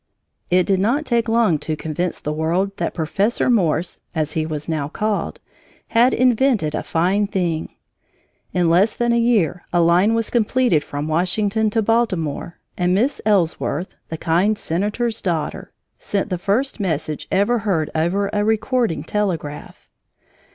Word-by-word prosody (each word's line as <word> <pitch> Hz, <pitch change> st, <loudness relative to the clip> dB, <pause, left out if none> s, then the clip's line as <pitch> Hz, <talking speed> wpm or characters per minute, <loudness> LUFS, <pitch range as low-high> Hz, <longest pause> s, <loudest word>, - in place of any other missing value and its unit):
It 180 Hz, 0 st, +3 dB
did 195 Hz, -2 st, +1 dB
not 245 Hz, +10 st, +1 dB
take 235 Hz, -3 st, +1 dB
long 225 Hz, -9 st, +3 dB
to 155 Hz, +1 st, -3 dB
convince 160 Hz, +3 st, -3 dB
the 150 Hz, -, -3 dB
world 175 Hz, +6 st, 0 dB
that 170 Hz, -, -2 dB
Professor 195 Hz, +10 st, 0 dB
Morse 175 Hz, -6 st, 0 dB
(as 155 Hz, -1 st, -1 dB
he 155 Hz, 0 st, -1 dB
was 150 Hz, -2 st, -5 dB
now 155 Hz, -4 st, -1 dB
called) 210 Hz, +6 st, -2 dB, 0.5 s
had 240 Hz, +3 st, +4 dB
invented 245 Hz, -, +2 dB
a -, -, -1 dB
fine 190 Hz, +5 st, +1 dB
thing. 175 Hz, -5 st, -2 dB, 0.8 s
In 180 Hz, -2 st, +1 dB
less 185 Hz, +6 st, +3 dB
than 240 Hz, 0 st, +1 dB
a 235 Hz, -, +3 dB
year 205 Hz, -8 st, +1 dB
a 175 Hz, -, +2 dB
line 175 Hz, +6 st, +4 dB
was 230 Hz, -1 st, -1 dB
completed 235 Hz, -, +2 dB
from 145 Hz, +1 st, -5 dB
Washington 200 Hz, +6 st, +1 dB
to 220 Hz, +1 st, 0 dB
Baltimore, 185 Hz, -9 st, -1 dB, 0.2 s
and 180 Hz, 0 st, +1 dB
Miss 255 Hz, +8 st, +1 dB
Ellsworth, 180 Hz, -4 st, 0 dB, 0.2 s
the 160 Hz, -, -4 dB
kind 180 Hz, +7 st, +1 dB
senator's 210 Hz, +7 st, -2 dB
daughter, 170 Hz, -6 st, -3 dB, 0.3 s
sent 200 Hz, +1 st, -2 dB
the 180 Hz, -, -1 dB
first 230 Hz, +8 st, 0 dB
message 155 Hz, -5 st, -2 dB
ever 205 Hz, +5 st, +2 dB
heard 185 Hz, -7 st, -1 dB
over 190 Hz, +5 st, 0 dB
a 205 Hz, -, +1 dB
recording 220 Hz, -, 0 dB
telegraph. 170 Hz, -6 st, -4 dB
190 Hz, 150 wpm, -20 LUFS, 165-220 Hz, 0.8 s, had